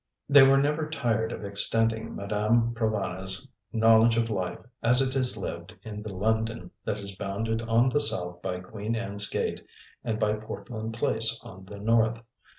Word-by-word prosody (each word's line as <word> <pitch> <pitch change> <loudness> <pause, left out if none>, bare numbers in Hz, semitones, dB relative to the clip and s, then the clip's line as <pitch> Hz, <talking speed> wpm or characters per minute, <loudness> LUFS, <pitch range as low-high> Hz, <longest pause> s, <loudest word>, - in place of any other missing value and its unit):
They 145 0 +8
were 135 +1 +7
never 150 +2 +1
tired 120 -6 0
of 105 - -6
extending 115 +3 0
Madame 110 +4 +1
Provana's 100 -1 -2 0.2
knowledge 115 +1 +5
of 115 -1 +1
life 95 -4 -2 0.2
as 125 +2 +4
it 135 0 0
is 130 -2 +2
lived - - -6
in 105 -1 -7
the 105 -1 -6
London 110 0 -1
that 105 - -1
is 100 -1 -6
bounded 110 +4 -2
on 115 +2 +3
the 130 +3 +2
south 90 -9 +1
by 90 -1 -3
Queen 105 +4 -4
Anne's 100 -3 -1
Gate - - -2 0.4
and 110 -2 -2
by 105 -2 +2
Portland 110 +1 -6
Place 115 0 +1
on 95 0 -11
the 100 +2 -10
north. 115 +2 +2
110 Hz, 165 wpm, -27 LUFS, 100-115 Hz, 0.4 s, They